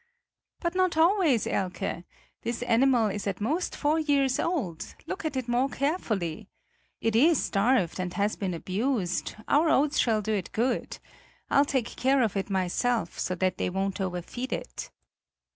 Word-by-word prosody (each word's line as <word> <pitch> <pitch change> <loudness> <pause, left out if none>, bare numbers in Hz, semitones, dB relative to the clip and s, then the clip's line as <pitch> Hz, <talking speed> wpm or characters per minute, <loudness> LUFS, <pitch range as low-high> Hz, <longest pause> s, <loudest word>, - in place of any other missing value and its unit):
"But 340 -1 -1
not 370 -3 +1
always, 330 - +4
Elke; 185 -2 -2 0.4
this 235 +1 -3
animal 245 -2 +3
is 205 +1 -4
at 195 -2 -2
most 305 - -1
four 305 +2 +1
years 280 -4 +2
old; 220 - -2
look 375 - -5
at 310 - -2
it 255 -2 -3
more 245 +3 +2
carefully. 225 - -2 0.5
It 225 -1 +1
is 300 +6 +5
starved 200 -4 +1
and 180 -1 -2
has 205 +1 +1
been 185 -4 -3
abused; 190 +1 -1
our 310 +3 +4
oats 295 0 +3
shall 220 -3 +2
do 220 - -1
it 195 -4 -2
good. 240 +3 -1 0.5
I'll 280 - +5
take 265 -5 0
care 265 0 +3
of 215 -3 -1
it 195 +1 -2
myself, 190 +2 0
so 185 - -1
that 185 0 0
they - - 0
won't 195 +1 -2
overfeed 190 +8 -4
it." - - -5
235 Hz, 160 wpm, -27 LUFS, 195-280 Hz, 0.5 s, is